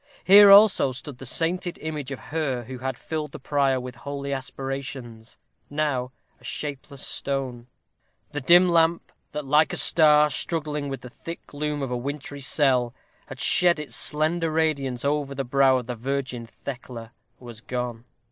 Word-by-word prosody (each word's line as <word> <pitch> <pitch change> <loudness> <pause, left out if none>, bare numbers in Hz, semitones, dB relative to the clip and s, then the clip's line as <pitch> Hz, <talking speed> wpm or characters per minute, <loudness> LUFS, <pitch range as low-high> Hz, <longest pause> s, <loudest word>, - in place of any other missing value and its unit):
Here 200 +1 +9
also 200 -9 +7
stood 135 0 -8
the 135 - -8
sainted 175 +4 -1
image 150 -3 -5
of 135 - -5 0.2
her 140 -7 -1
who 125 +2 -8
had 130 -1 -3
filled 155 -3 -5
the - - -6
prior 135 -1 +1
with 125 -1 -8
holy 140 +1 -5
aspirations, 135 -3 -6 0.3
now 145 -4 -1 0.3
a - - -24
shapeless 140 -2 -5
stone. 130 -3 -3 0.6
The 145 0 -4
dim 175 +7 +6
lamp, 170 -1 +2 0.2
that, 150 0 -5
like 150 +3 +3
a - - -2
star 150 -2 +5
struggling 150 -2 -3
with 135 - -5
the 125 - -11
thick 165 +5 -9
gloom 150 0 -3
of 130 - -4
a 125 - -1
wintry 140 +2 -6
cell, 130 -3 +1 0.3
had - - -10
shed 175 -2 +4
its 150 -1 -7
slender 160 +2 0
radiance 140 -6 -1
over 140 -1 -1
the 135 - -2
brow 135 +1 +4
of 125 - -4
the 125 - -4
Virgin 125 -1 -4
Thecla, 120 -2 -8 0.3
was 120 -3 -10
gone. 125 -2 -4
140 Hz, 165 wpm, -25 LUFS, 125-150 Hz, 0.6 s, Here